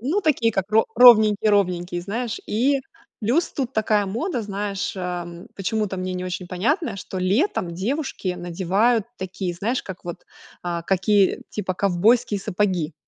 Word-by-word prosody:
Ну, 300 - 0
такие, 265 - +2
как 195 +1 -2
ро 220 +1 +4
ровненькие-ровненькие, 205 -7 +5
знаешь. 225 +5 -3
И 265 +6 +1 0.4
плюс 250 +11 +1
тут 265 -2 -3
такая 215 -2 +2
мода, 240 - -2
знаешь, 200 -1 -3
ам, 175 -1 -5
почему-то 205 0 -2
мне 185 0 -3
не 180 0 -4
очень 180 0 -4
понятно, 195 - -1
что 190 0 -6
летом 185 - 0
девушки 235 - -3
надевают 190 +6 +1
такие, 185 -1 -4
знаешь, 225 +9 -1
как 190 -1 -9
вот, 175 -1 -7 0.4
а, 170 -1 -3
какие, 195 +2 +2
типа 195 -3 -3
ковбойские 200 +4 +2
сапоги. 185 -5 -1
200 Hz, 140 wpm, -23 LUFS, 180-230 Hz, 0.4 s, ровненькие-ровненькие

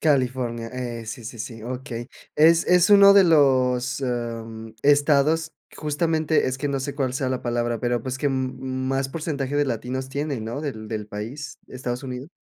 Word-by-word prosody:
California. 125 -5 0
Eh, 120 -3 -5
sí, 115 +1 -7
sí, 115 +1 -8
sí, 115 0 -7
okey. 125 -1 -6 0.3
Es 165 +2 +5
es 180 +2 +4
uno 200 -1 +9
de 200 -1 +7
los, 130 -5 +3
em, 115 -3 -4
estados, 145 +2 +3 0.2
justamente, 155 +1 +1
es 130 +1 -2
que 145 +1 -2
no 140 -1 -1
sé 140 +1 -4
cuál 130 -3 -1
sea 130 0 -1
la 130 -1 -2
palabra, 120 -1 -1
pero, 120 -1 0
pues, 130 +1 -4
que 145 - 0
m 130 -2 -1
más 130 +1 -2
porcentaje 145 -2 -3
de 145 - +3
latinos 130 +1 -3
tienen, 140 -4 -3
¿no?, 115 +6 -4
del 110 -8 -5
del 105 -1 -4
país, 125 +8 -7
Estados 125 0 -4
Unidos. 130 +1 -6
130 Hz, 180 wpm, -24 LUFS, 120-145 Hz, 0.3 s, uno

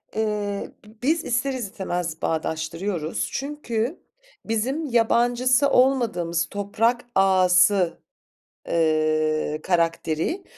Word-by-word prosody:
Eee, 210 -2 -2
bi 215 +1 -18
biz 315 +4 +1
ister 260 +3 0
istemez 180 -8 -4
bağdaştırıyoruz 160 +2 -2
çünkü 275 -1 -3 0.5
bizim 255 +8 -1
yabancısı 245 +2 +2
olmadığımız 225 -11 +2
toprak 225 +5 0
ağası, 185 -1 +4 0.7
eee, 155 -1 +1
karakteri 165 - 0
205 Hz, 80 wpm, -24 LUFS, 170-245 Hz, 0.7 s, ağası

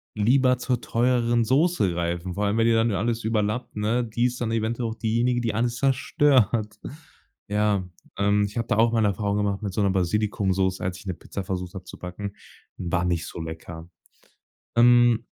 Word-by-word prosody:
lieber 125 +4 +3
zur 125 -1 -1
teureren 120 0 +1
Soße 140 - +2
greifen. 85 +1 -3
Vor 105 +3 -1
allem, 100 +2 0
wenn 115 - +3
die 115 - +4
dann 115 0 +2
alles 115 +4 -1
überlappt, 110 +2 -1
ne? 110 +4 0
Die 120 +1 -1
ist 125 0 -2
dann 115 -2 -1
eventuell 115 +1 -1
auch 110 - -6
diejenige, 115 +2 0
die 115 -2 -1
alles 120 +2 0
zerstört. 125 -5 +2 0.7
Ja, 105 -2 0 0.3
ähm, 100 +1 +2
ich 100 +2 -7
habe 115 0 -1
da 115 - +1
auch 115 +1 +4
mal 115 -1 +2
'ne 105 - +3
Erfahrung 100 +1 -1
gemacht 100 -1 -1
mit 100 -3 -4
so 105 - 0
'ner 100 - +3
Basilikumsoße, 95 0 0
als 90 0 -2
ich - - -15
'ne 95 - -2
Pizza 95 +3 -7
versucht 90 -1 -4
habe 95 - -7
zu - - -10
backen, 100 +3 -6 0.4
war 90 0 -1
nicht 85 -2 -1
so 85 - -7
lecker. 80 +1 -8 0.9
Ähm 120 -1 +5
105 Hz, 190 wpm, -25 LUFS, 95-120 Hz, 0.9 s, Ähm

